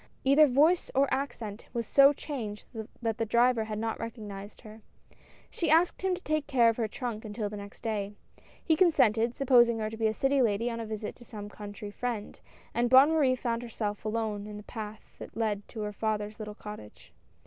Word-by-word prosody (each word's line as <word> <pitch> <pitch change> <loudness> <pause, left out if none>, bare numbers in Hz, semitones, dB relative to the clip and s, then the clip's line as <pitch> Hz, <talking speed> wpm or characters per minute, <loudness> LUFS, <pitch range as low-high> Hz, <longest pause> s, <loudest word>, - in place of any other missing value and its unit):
Either 280 +3 +6
voice 305 +7 +3
or 275 +1 +4
accent 235 -6 -4
was 235 -1 -2
so 275 +5 +6
changed 235 -8 -6 0.4
that 225 -1 -1
the - - +2
driver 235 +1 +3
had 215 -1 -4
not 225 +1 -2
recog 230 -2 -6
nized 200 +1 -9
her. 220 -1 -12 0.7
She 335 - -1
asked 330 +3 +3
him 380 -1 +1
to 365 - -10
take 310 -1 -1
care 245 -5 +4
of 225 - -1
her 230 -2 0
trunk 225 0 -5
until 210 -1 -4
the 210 - -7
next 200 0 -10
day. 205 -2 -3 0.5
He 320 - +4
consented, 240 - +3
supposing 240 -4 +4
her 215 -1 -2
to 225 - -7
be 225 0 +2
a 215 - 0
city 270 +2 +2
lady 230 +1 +1
on 230 - -4
a 225 - -5
visit 215 -1 -5
to 240 - -14
some 210 -3 -8
country 205 0 -8
friend, 230 -1 -4 0.3
and 240 +1 +1
Bonne 265 +4 +7
Marie 285 -5 +3
found 235 -2 -2
herself 215 -3 -4
alone 215 -2 -2
in 210 -1 -7
the 210 - -9
path 215 -1 -7 0.2
that - - -10
led 210 -3 -1
to 220 - -7
her 210 0 -3
father's 215 0 -2
little 210 -1 -6
cottage. 210 - -11
225 Hz, 205 wpm, -29 LUFS, 210-255 Hz, 0.7 s, Bonne